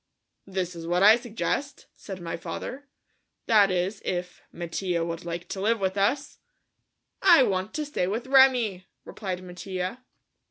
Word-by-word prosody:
"This 185 -2 -3
is 165 0 -7
what 175 +2 +2
I 215 +2 +9
suggest," 245 +4 -3
said 190 -2 -8
my 170 -1 -4
father, 250 +12 -6 0.6
"that 210 -3 +5
is 185 +3 -1
if 180 -3 -4
Mattia 170 0 -2
would 170 0 -5
like 170 0 -5
to 190 - -4
live 225 +3 +2
with 190 -1 -1
us?" 265 +9 0 0.8
"I 345 -7 +7
want 190 -1 -1
to 305 - -2
stay 285 -11 -1
with 220 +6 -2
Remi," 250 -8 +4 0.2
replied 185 -3 -5
Mattia. 185 +5 -5
190 Hz, 150 wpm, -26 LUFS, 180-235 Hz, 0.8 s, I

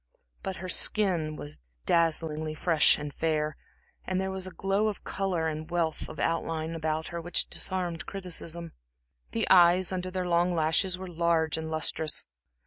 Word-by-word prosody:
But 190 - -4
her 185 - -6
skin 175 -5 +2
was 75 - -7 0.2
dazzlingly 160 -2 +1
fair 170 +2 0 0.2
and 150 -1 -6
fresh, 155 -1 0 0.5
and 185 0 0
there 190 0 -1
was 190 -1 -1
a - - -7
glow 195 +3 0
of 210 - -4
color 185 -4 -1
and 155 0 -4
wealth 170 -2 -1
of - - -9
outline 165 -1 -1
about 160 -1 -2
her 170 0 -5
which 175 +2 +1
disarmed 180 -1 -1
criticism. 170 -3 -3 0.6
The - - -1
eyes, 180 0 +6
under 185 0 -2
their 185 -1 -2
long 175 +1 +2
lashes, 165 +4 +2
were 190 0 -7
large 170 -2 +1
and 160 0 -4
lustrous. 155 -1 +1
170 Hz, 160 wpm, -29 LUFS, 160-185 Hz, 0.6 s, eyes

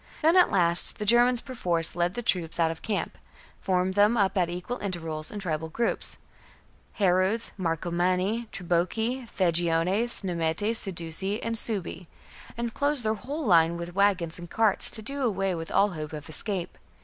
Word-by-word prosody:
Then 325 +3 +4
at 365 - +6
last 175 -3 +5
the 210 - -4
Germans 240 +2 +4
perforce 175 - -1
led 175 +1 -1
their 240 - -4
troops 175 -6 -1
out 165 -1 +2
of 165 - -9
camp, 210 -3 -4 0.4
formed 185 0 0
them 205 +4 +3
up 200 -2 +1
at 180 -3 +1
equal 180 +8 -5
intervals 165 -5 -4
in 210 - -7
tribal 160 -5 -3
groups 230 +8 -2 0.4
— - - -31
Harudes, 190 +4 +2
Marcomanni, 180 +5 -1
Triboci, 220 +8 -1
Vangiones, 175 +6 +1
Nemetes, 175 +5 0
Sedusii, 190 +2 -2
and 230 - -2
Suebi 195 -6 0 0.2
— - - -18
and 235 -1 -3
closed 285 -4 0
their 215 - +2
whole 280 +8 -5
line 170 -4 +4
with 170 +1 -7
wagons 185 -4 +1
and 175 -1 -9
carts, 220 -1 +3
to 220 - -7
do 275 +5 -3
away 195 -5 0
with 165 -1 -6
all 205 - +3
hope 155 -3 -7
of 150 -1 -7
escape. 180 +3 -2
190 Hz, 170 wpm, -26 LUFS, 170-225 Hz, 0.4 s, at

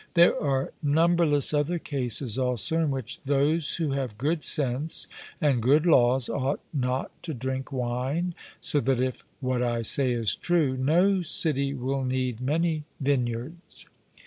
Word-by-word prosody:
There 170 0 +6
are 135 -2 0
numberless 155 -1 +2
other 150 +4 +1
cases 125 -6 -2
also 125 +3 0
in 160 -2 +1
which 130 -3 -4
those 145 +3 +1
who 160 -4 -1
have 130 -6 -3
good 150 +6 -1
sense 140 +2 -1 0.3
and 140 -6 +2
good 145 +7 +4
laws 130 -5 +4
ought 140 +1 -1
not 130 -2 -1
to 160 -4 -5
drink 130 +3 -4
wine, 130 +7 -2 0.3
so 145 - 0
that 130 -1 +1
if 130 0 -2 0.2
what 130 -1 0
I 120 -1 0
say 130 +2 +2
is 115 -3 0
true, 160 -7 +1
no 175 +9 +3
city 140 -4 0
will 135 +1 -2
need 130 -2 -2
many 155 +3 0 0.2
vineyards. 135 +3 -2
135 Hz, 145 wpm, -27 LUFS, 125-155 Hz, 0.3 s, There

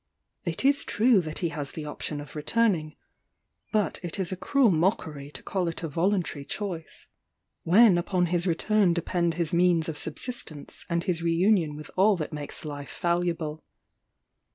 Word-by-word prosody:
It - - -3
is 280 +1 +4
true 225 -2 +3
that 155 -2 -5
he - - +1
has 145 -3 -5
the 155 - -6
option 150 0 -4
of 145 0 -10
returning; 155 -1 +1 0.8
but 210 -3 0
it 175 +1 -4
is 185 -2 -2
a - - -1
cruel 250 +4 +3
mockery 155 -5 0
to - - -10
call 185 -3 -1
it 165 +1 -4
a - - -1
voluntary 170 -1 0
choice, 175 -1 -5 0.6
when 190 +1 +6
upon 180 +1 +1
his 175 +1 0
return 185 +2 +2
depend 170 -1 0
his 170 -2 0
means 170 -2 +3
of 155 -3 -3
subsistence 160 - -6
and 170 0 0
his 180 -4 -1
re 170 0 +1
union 175 -4 +3
with 150 0 -10
all 195 +1 +4
that 155 -1 -4
makes 150 +1 -7
life 145 -1 -7
valuable. 170 -3 -1
170 Hz, 170 wpm, -27 LUFS, 155-190 Hz, 0.8 s, when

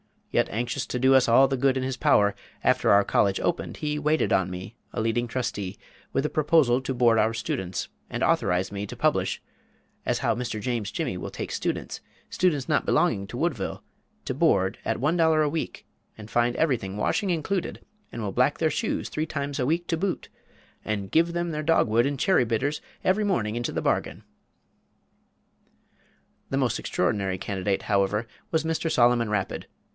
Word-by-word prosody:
Yet - - +2
anxious 120 +5 -2
to - - -2
do 130 +2 +4
us 130 -2 +5
all 125 +4 +6
the 135 - 0
good 135 +1 +2
in 130 - -1
his 130 -1 -2
power, 105 -4 +4 0.3
after - - +3
our 100 0 +6
college 100 -1 +2
opened, 175 0 -2
he 150 -1 -2
waited 150 +1 +1
on 95 -1 +2
me, 90 +5 -7 0.2
a - - -1
leading 115 +2 0
trustee, 105 -6 -3 0.4
with 135 - +1
a - - +1
proposal 150 -5 +3
to 130 0 -3
board 120 -2 +4
our 110 +1 +2
students, 95 -5 -3 0.2
and - - -3
authorized 90 +2 +1
me 100 0 -4
to - - -8
publish - - 0 0.6
"as - - 0
how - - +1
Mr. 115 -2 -3
James 115 -3 -2
Jimmy 125 - -3
will - - -5
take - - -6
strange - - -2
students - - -7 0.3
students 160 -6 0
not 150 - +2
belonging 105 - +2
to 120 - -7
Woodville 145 - -2 0.4
to - - -3
board, 95 +2 +2
at - - -1
one 155 +5 +2
dollar 160 -2 +4
a 150 - +1
week, 160 +1 -4 0.3
and 110 0 -11
find 120 0 +2
everything, 120 -11 0
washing 200 - 0
included, 175 +2 -2 0.3
and 115 - -5
will 100 - -2
black 125 +7 +2
their 160 -1 +1
shoes 230 -2 -2
three 155 +1 -2
times 140 -2 -3
a 125 - +1
week 170 +3 0
to 165 - 0
boot, 190 +2 -2 0.6
and 100 -3 -3
give 170 +1 +3
them 175 0 -1
their 150 -1 -2
dog 165 -3 +3
wood 115 +3 +3
and 140 0 -2
cherry 185 -7 +3
bitters 130 +7 -1 0.2
every 200 +3 +2
morning 115 - 0
into 120 - -2
the - - -1
bargain!" - - -1 2.3
The 135 - -1
most 125 -5 +1
extraordinary 100 -4 -1
candidate, 95 +1 -2
however, 100 +2 +1 0.2
was 160 -1 +1
Mr. 165 0 -1
Solomon 120 -4 +3
Rapid. 105 -3 -2
125 Hz, 190 wpm, -26 LUFS, 105-155 Hz, 2.3 s, all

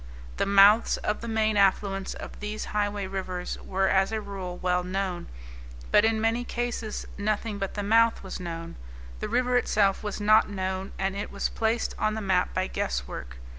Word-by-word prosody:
The - - +1
mouths 200 +3 +6
of 210 - -2
the 235 - -5
main 220 -1 +1
affluents 195 0 +2
of - - -9
these 210 +1 -4
highway 205 -1 0
rivers 185 -2 -4
were 190 0 0
as 190 +2 +3
a 220 - -1
rule 195 -3 -6
well 180 0 0
known. 185 -1 -3 0.6
But 210 - +6
in 225 0 +2
many 225 +2 +1
cases 240 -3 -3
nothing 210 0 -1
but 195 -1 -3
the 205 - -2
mouth 225 +2 +3
was 190 - -6
known. 165 -2 -6 0.4
The - - -4
river 250 0 +2
itself 200 -5 +2
was 210 -1 -4
not 215 +1 +5
known, 190 -1 -3
and 195 0 -1
it 200 - -4
was - - -1
placed 225 +1 0
on 215 0 +1
the - - -2
map 190 -3 +1
by 185 - 0
guesswork. - - -4
200 Hz, 180 wpm, -27 LUFS, 190-215 Hz, 0.6 s, mouths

